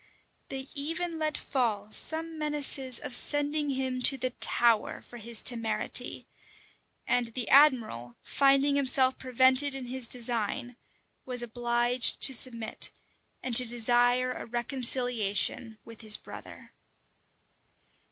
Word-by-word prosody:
They 265 0 -7
even 325 +3 -5
let 310 -1 -2
fall 215 -6 -3
some 325 +5 +3
menaces 285 -4 -1
of 280 -4 -6
sending 290 +1 -2
him 260 -1 -4
to 270 +2 +6
the 255 -1 -4
Tower 235 -2 +2
for 240 - -14
his 230 0 -3
temerity; 230 -3 -2 0.8
and 245 -1 -1
the 230 +1 -5
admiral, 230 - +2
finding 275 +1 +1
himself 260 -1 +2
prevented 260 +2 +2
in 265 -2 -7
his 250 -1 0
design, 240 +1 -1 0.5
was 250 -2 0
obliged 240 +1 +1
to 265 - +4
submit, 230 -3 -3 0.5
and 250 -2 -4
to 250 - +8
desire 245 +1 +1
a - - -10
reconciliation 240 -3 -2
with 230 0 -12
his 215 -1 +6
brother. - - -13
250 Hz, 120 wpm, -27 LUFS, 235-275 Hz, 0.8 s, to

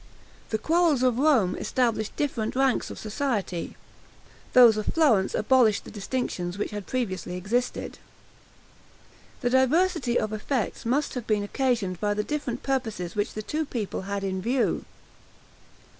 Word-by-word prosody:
The 220 - 0
quarrels 320 0 +2
of 250 -1 +2
Rome 265 -11 +3
established 230 -4 0
different 240 -7 -2
ranks 265 -1 +1
of - - -8
society, 215 - -3 0.8
those 240 -3 +8
of 215 -1 -3
Florence 250 -13 +3
abolished 225 -2 +3
the - - -11
distinctions 195 -4 -3
which 210 - -3
had 205 -3 -6
previously 185 -8 -3
existed. 235 +7 -2 1.4
This 245 -2 0
diversity 260 0 +2
of 215 0 -2
effects 225 +1 -2
must 280 +5 +1
have 245 -3 -5
been 210 -2 +1
occasioned 215 -6 -1
by 205 0 +1
the 210 - 0
different 265 -3 -3
purposes 220 -10 -2
which 205 +1 -1
the 215 - -4
two 310 +8 -2
people 230 -11 -4
had 200 +1 -4
in 190 -1 -2
view. 245 +5 0
230 Hz, 145 wpm, -26 LUFS, 205-260 Hz, 1.4 s, those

